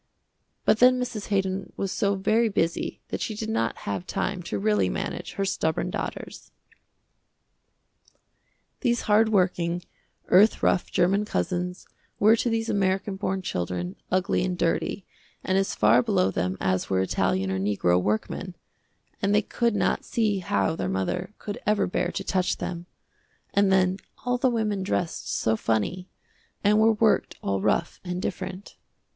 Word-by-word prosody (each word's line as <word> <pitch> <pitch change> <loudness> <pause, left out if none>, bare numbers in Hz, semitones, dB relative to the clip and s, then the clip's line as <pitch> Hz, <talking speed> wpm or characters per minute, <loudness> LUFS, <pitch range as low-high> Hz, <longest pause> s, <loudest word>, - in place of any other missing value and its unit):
But 220 - +4
then 255 +1 +6
Mrs. 235 -4 -4
Haydon 195 -1 -1
was 195 -1 -2
so 200 -1 +1
very 220 +4 +2
busy 165 -4 -1
that - - -4
she 220 - -3
did 220 +1 -4
not 115 - 0
have 100 -3 -3
time 190 -2 -2
to 135 -11 -4
really 100 -2 +2
manage - - -4
her 195 - -1
stubborn 160 -4 -1
daughters. - - -6 2.3
These 240 -3 +1
hard 215 +1 +4
working, 180 -3 +1 0.5
earth 205 +4 +5
rough 180 - +2
german 190 +4 +2
cousins 180 -3 -2 0.3
were 215 +2 +6
to 240 - 0
these 225 0 -1
american 195 0 0
born 190 -1 -2
children, 90 - -3
ugly 185 +1 +1
and 180 -1 -2
dirty, 175 +3 -1 0.4
and 190 - 0
as 195 0 +1
far 110 +4 +5
below 95 -5 +1
them 90 0 -1
as 95 -1 0
were 95 -1 +2
italian 95 0 0
or 95 - -1
negro 95 -3 +2
workmen, 110 - -2 0.7
and 200 0 +2
they 210 - +3
could 235 +1 0
not - - +1
see 215 -4 0
how 185 -3 0
their 95 - -2
mother 95 - -2
could 205 - -6
ever 210 0 +3
bear 180 0 -1
to 195 - -4
touch 185 -1 0
them, 175 0 -5 0.7
and 200 -1 +3
then 185 0 +3 0.3
all 245 0 +1
the 260 - +3
women 215 -4 -1
dressed 180 -3 -2
so 110 - +1
funny, 115 - -1 0.5
and 210 +1 +4
were 225 +1 +5
worked 220 0 +2
all 100 -1 0
rough 170 - 0
and 180 -1 -3
different. 185 +1 -5
185 Hz, 155 wpm, -26 LUFS, 155-210 Hz, 2.3 s, then